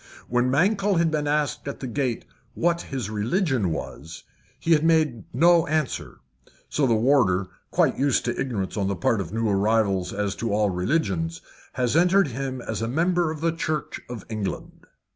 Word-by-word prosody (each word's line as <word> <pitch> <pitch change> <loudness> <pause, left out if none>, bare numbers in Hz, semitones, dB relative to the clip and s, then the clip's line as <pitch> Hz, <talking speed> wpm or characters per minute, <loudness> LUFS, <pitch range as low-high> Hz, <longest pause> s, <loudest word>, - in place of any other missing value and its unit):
When 125 +1 +1
Mankell 195 +8 +2
had 165 -1 +2
been 150 -1 -1
asked 150 -1 -1
at 140 - -5
the - - -5
gate 125 -1 -2 0.3
what 170 0 +1
his 125 -7 -5
religion 120 - 0
was, 80 +1 -6 0.4
he 165 - -1
had 155 -2 +5
made 155 -8 +2
no 170 -1 +4
answer; 155 -3 -2 0.5
so 145 -3 +1
the 115 - +3
warder, 110 -7 +3 0.2
quite - - +2
used 140 -2 +2
to 120 - -1
ignorance 110 -7 -3
on 100 -2 0
the 100 - -1
part 100 +4 +1
of 90 -3 -6
new 115 +1 -1
arrivals 100 -2 +1
as 100 0 -2
to 115 - -2
all 105 -1 +2
religions, 165 - -1 0.3
had 125 0 0
entered 180 0 +4
him 130 0 -4
as 110 0 -4
a 115 - -1
member 170 +6 +1
of 155 -1 -5
the 165 0 +2
Church 155 -2 -3
of 120 -2 -7
England. 110 -3 -5
130 Hz, 180 wpm, -24 LUFS, 110-160 Hz, 0.5 s, had